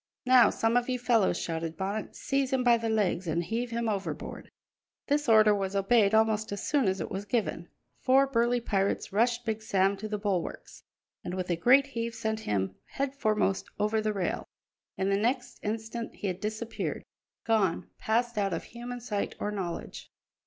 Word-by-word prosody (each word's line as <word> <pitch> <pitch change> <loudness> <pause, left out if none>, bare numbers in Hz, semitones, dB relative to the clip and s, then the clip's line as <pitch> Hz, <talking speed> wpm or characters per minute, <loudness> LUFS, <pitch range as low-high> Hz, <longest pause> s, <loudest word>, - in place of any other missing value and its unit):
"Now 255 -1 +7
some 225 +2 +1
of 245 +1 0
you 255 - 0
fellows," 230 -7 +2
shouted 165 -1 -3
Bonnet, 200 +3 -3
"seize 275 -1 -1
him 260 -1 +1
by 240 -1 +6
the 230 -1 -2
legs 195 -5 0
and 165 +2 0
heave 235 +6 -2
him 235 0 -2
overboard!" 200 -3 -4 0.6
This 290 -2 +1
order 215 -1 +7
was 195 -1 -2
obeyed 200 +1 +4
almost 220 -1 +2
as 205 - -4
soon 280 -7 +2
as 190 0 0
it - - -4
was 195 +1 -3
given; 225 0 -1 0.3
four 270 +1 +4
burly 245 -2 +2
pirates 200 -2 -1
rushed 235 +3 +2
Big 220 -1 -2
Sam 195 -2 +2
to 215 +2 -5
the 210 0 -2
bulwarks, 200 -4 -3 0.4
and 180 - -4
with 185 -1 -2
a - - +2
great 255 +11 +5
heave 235 -4 -4
sent 220 -1 -2
him 95 - -1 0.2
headforemost 220 -8 0
over 215 +1 +1
the 215 0 0
rail. 195 -4 -2 0.5
In 190 +1 0
the 195 - +3
next 245 +4 -1
instant 225 +2 -4
he - - -7
had 185 -2 -2
disappeared 215 +2 -4 0.4
gone, 210 -7 +1
passed 235 0 0
out 195 -2 0
of 165 - -3
human 245 +1 -7
sight 210 -4 -3
or 210 - -2
knowledge. 185 -5 -5
220 Hz, 180 wpm, -29 LUFS, 195-240 Hz, 0.6 s, Now